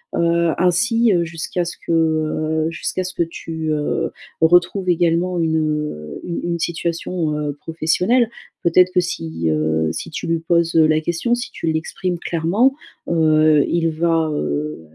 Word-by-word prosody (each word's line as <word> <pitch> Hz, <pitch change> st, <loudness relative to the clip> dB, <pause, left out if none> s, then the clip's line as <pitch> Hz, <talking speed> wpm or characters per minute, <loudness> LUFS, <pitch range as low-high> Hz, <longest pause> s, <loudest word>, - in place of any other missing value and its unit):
heu, 170 Hz, 0 st, +2 dB
ainsi, 225 Hz, +6 st, +3 dB
heu, 175 Hz, -1 st, +2 dB
jusqu'à 170 Hz, +2 st, -3 dB
ce 170 Hz, 0 st, -5 dB
que, -, -, -2 dB
heu, 155 Hz, -1 st, +1 dB
jusqu'à 170 Hz, +2 st, -3 dB
ce 185 Hz, 0 st, -5 dB
que -, -, +2 dB
tu, 160 Hz, -1 st, -5 dB
heu, 150 Hz, -1 st, -1 dB, 0.3 s
retrouves 175 Hz, +3 st, +3 dB
également 175 Hz, +1 st, +1 dB
une, 160 Hz, -1 st, +1 dB
heu, 150 Hz, -, -3 dB
une 175 Hz, -, -4 dB
une 170 Hz, 0 st, -2 dB
situation, 170 Hz, -1 st, -2 dB
heu, 150 Hz, -1 st, -2 dB
professionnelle. 170 Hz, -, +1 dB, 0.3 s
Peut-être 180 Hz, +2 st, +4 dB
que 180 Hz, -, +2 dB
si, 80 Hz, -, -3 dB
heu, 80 Hz, +1 st, +1 dB
si -, -, -5 dB
tu -, -, -5 dB
lui 165 Hz, 0 st, +1 dB
poses, 170 Hz, 0 st, +1 dB
heu, 160 Hz, -1 st, +6 dB
la 155 Hz, 0 st, +3 dB
question, 170 Hz, +9 st, -1 dB
si 240 Hz, +1 st, -2 dB
tu -, -, -5 dB
l'exprimes 175 Hz, +3 st, -3 dB
clairement, 180 Hz, +12 st, +1 dB, 0.3 s
heu, 155 Hz, -2 st, +4 dB
il 165 Hz, -1 st, +1 dB
va, 165 Hz, 0 st, +1 dB
heu, 75 Hz, -, -2 dB
165 Hz, 160 wpm, -20 LUFS, 155-175 Hz, 0.3 s, heu